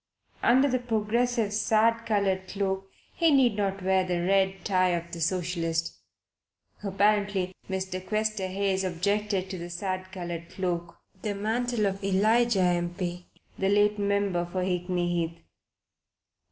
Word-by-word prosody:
Under 260 +4 +5
the 255 -2 +1
Progressive's 230 -1 0
sad 230 +2 +2
coloured 195 -3 +1
cloak 195 -1 -2 0.2
he 335 -1 +3
need 260 -7 +4
not 195 -2 -1
wear 190 0 +3
the 180 -1 -1
red 190 -1 +1
tie 185 -3 +3
of 170 0 -5
the 170 - -6
socialist. 165 - -1 0.9
Apparently 200 -1 +1 0.2
Mr. 190 -1 -3
Questerhayes 200 -2 -1
objected 195 +2 0
to 185 - -5
the 170 +1 -6
sad 185 +1 -4
coloured 175 -3 -6
cloak, 175 -2 -3 0.2
the 210 -2 -2
mantle 225 +2 0
of 195 0 -2
Elijah, 215 +3 +3
M. 175 -1 +1
P., 180 -1 -4 0.3
the 195 - +2
late 205 +1 +3
member 200 -3 +1
for 185 +1 -2
Hickney 180 -1 -1
Heath. 170 -1 -2
190 Hz, 135 wpm, -27 LUFS, 180-210 Hz, 0.9 s, Under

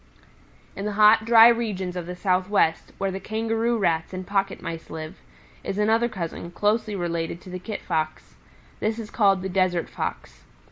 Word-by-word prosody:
"In 195 - -5
the 210 - -2
hot, 215 +1 +6
dry 230 0 +8
regions 210 -6 0
of 175 -2 -5
the 180 - -5
Southwest, 185 -2 +1
where 195 0 -1
the 190 - -4
Kangaroo 225 +2 -1
Rats 170 -4 0
and 185 0 -5
Pocket 195 0 -1
Mice 165 -1 -7
live, 160 +3 -8 0.4
is 195 - -4
another 225 +3 +2
cousin, 170 -4 -5
closely 210 +3 0
related 170 -2 -3
to 185 - -11
the 185 - -5
Kit 210 +3 -6
Fox. 155 -2 -3 0.5
This 220 +1 -1
is 220 -2 -7
called 195 -4 +3
the - - -2
Desert 180 -2 +1
Fox. - - -6
195 Hz, 175 wpm, -24 LUFS, 175-220 Hz, 0.5 s, dry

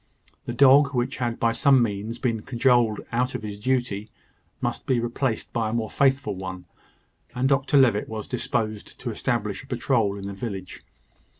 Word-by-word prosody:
The 120 - -4
dog, 140 +2 +6
which 125 +2 -1
had 120 -2 -2
by 115 - +3
some 135 +1 +4
means 105 +1 -3
been 115 -4 -1
cajoled 120 -3 +2
out 125 +2 0
of - - -5
his 105 -1 -6
duty, 120 -3 -1 0.5
must - - -3
be 130 -2 +2
replaced 120 0 -2
by 115 -2 0
a - - -4
more 115 -2 -2
faithful 135 -5 +2
one; 95 -1 -7 0.7
and 125 +2 +1
Dr 140 +1 +2
Levitt 120 -6 +3
was 110 -1 -5
disposed 110 -4 -3
to 125 - -4
establish 110 -2 -2
a - - -16
patrol 120 -5 0
in 100 - -7
the 100 - -5
village. 95 -3 -6
120 Hz, 175 wpm, -25 LUFS, 105-130 Hz, 0.7 s, dog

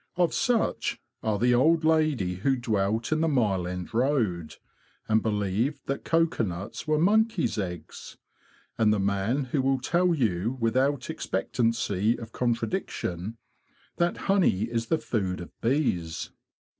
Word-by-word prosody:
Of 175 -1 +2
such 240 -3 0 0.2
are 110 -2 0
the 120 +3 +3
old 155 +7 +4
lady 155 - +2
who 135 +8 +1
dwelt 110 -1 -1
in 155 0 +2
the 165 - +2
Mile 105 - +1
End 90 +3 -5
Road, 110 - 0 0.5
and 110 0 +3
believed 110 +6 -1
that 140 - -3
cocoanuts 115 - -1
were 155 0 +2
monkeys' 195 - +2
eggs, 90 -5 -6 0.6
and 110 -2 +4
the 105 - +2
man 100 +7 0
who 140 - +2
will 135 0 +1
tell 175 +6 +2
you 115 - 0
without 130 +5 +1
expectancy 115 -3 0
of 115 -1 -9
contradiction 115 - -2 0.6
that 175 0 +1
honey 195 - +3
is 115 0 -2
the 160 - +2
food 95 -10 -2
of 90 - -8
bees. 115 - -1
115 Hz, 135 wpm, -27 LUFS, 100-150 Hz, 0.6 s, old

